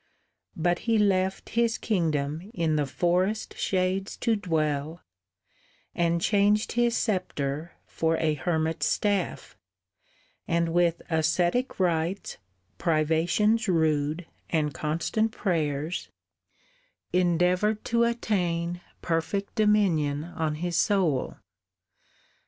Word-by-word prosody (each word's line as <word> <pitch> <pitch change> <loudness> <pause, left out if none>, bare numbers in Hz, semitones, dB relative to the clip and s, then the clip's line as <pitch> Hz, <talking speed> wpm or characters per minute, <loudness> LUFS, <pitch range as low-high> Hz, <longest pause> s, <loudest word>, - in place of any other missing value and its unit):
But 175 +1 +1
he 225 - +4
left 190 -2 +1
His 230 -1 +1
kingdom 160 -3 -1
in 165 -3 +1
the 150 -2 0
forest 180 +8 0
shades 190 +1 -1
to 230 -2 +1
dwell, 160 -4 -2 0.9
And 170 0 +1
changed 205 +4 +2
his 240 0 +2
sceptre 165 - -2
for 165 0 0
a 155 -1 +1
hermit's 160 0 -1
staff, 205 -4 -1 0.9
And 170 0 +1
with 170 0 +1
ascetic 175 - +1
rites, 175 +1 -1 0.4
privations 170 +8 +2
rude, 160 -1 +1 0.2
And 150 -3 0
constant 170 +10 -1
prayers, 155 -3 -2 1.0
endeavoured 180 +4 +2
to 235 0 +2
attain 175 -7 -1 0.2
Perfect 170 +4 -1
dominion 185 -10 +2
on 160 -2 -3
his 170 +2 -2
soul. 175 -10 +1
175 Hz, 95 wpm, -27 LUFS, 160-200 Hz, 1.0 s, he